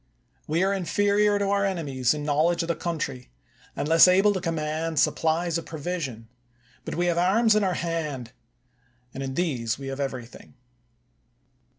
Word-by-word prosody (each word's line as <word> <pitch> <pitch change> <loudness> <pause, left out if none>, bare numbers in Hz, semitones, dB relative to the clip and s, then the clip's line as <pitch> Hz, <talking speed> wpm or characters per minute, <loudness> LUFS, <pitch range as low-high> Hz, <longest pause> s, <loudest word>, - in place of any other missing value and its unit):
We 165 +4 +1
are, 195 +1 +2
inferior 205 +2 +2
to 200 -1 -1
our 200 0 +2
enemies 150 -9 0
in 150 - -5
knowledge 155 +4 +1
of - - -5
the 170 - +1
coun 170 -1 -3
try, 130 -4 -5 0.5
and - - -2
less 165 +3 +7
able 195 +3 +4
to 185 - -3
command 160 -1 -2
supplies 165 +1 +1
of - - -11
pro 160 - -7
vision; 140 -9 -4 0.6
but - - -4
we 175 - 0
have 170 -1 +1
arms 215 +5 +3
in 215 - +3
our 185 -2 0
hands, 150 -8 -3 0.8
and 135 - -6
in 135 -1 -4
these 125 -11 -1
we 135 0 -6
have 135 +1 -5
everything. 130 -3 -6
165 Hz, 175 wpm, -25 LUFS, 140-180 Hz, 0.8 s, less